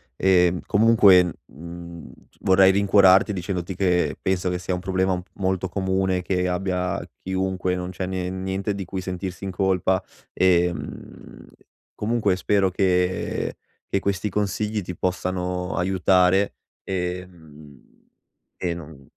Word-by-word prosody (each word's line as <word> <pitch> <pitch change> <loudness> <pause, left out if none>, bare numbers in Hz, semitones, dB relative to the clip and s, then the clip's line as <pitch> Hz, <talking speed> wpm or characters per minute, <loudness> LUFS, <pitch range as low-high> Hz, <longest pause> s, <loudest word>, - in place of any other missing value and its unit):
Ehm, 90 0 +3
comunque, 100 -5 +5
mhmm, 85 +2 -10 0.2
c - - -31
vorrei 95 0 +5
rincuorarti 100 0 +5
dicendoti 90 -1 -4
che 90 -1 +1
penso 95 -1 0
che 90 - -1
sia 90 +1 -3
un 90 - -2
problema 95 +1 0
un 90 - -1
p 90 - -23
molto 95 -1 -1
comune 95 -1 0
che 90 0 -1
abbia 90 0 -2 0.2
chiunque, 95 -1 -1
non 90 0 -4
c'è 95 0 -4
nie 90 -1 -3
niente 95 +2 -3
di 100 -2 -5
cui 95 +1 -5
sentirsi 90 0 -5
in 95 - -3
colpa, 95 0 +1 0.3
ehm, 90 -1 -1 0.5
comunque 105 -4 0
spero 100 0 +2
che 90 -1 0 0.3
che 100 - +1
questi 100 +1 -1
consigli 105 +2 -1
ti 90 -1 -7
possano 90 0 -2
aiutare, 95 +1 +2 0.3
ehm, 90 -6 -6 0.7
e 90 -2 -2
non 80 -5 -11
95 Hz, 130 wpm, -23 LUFS, 90-95 Hz, 0.7 s, comunque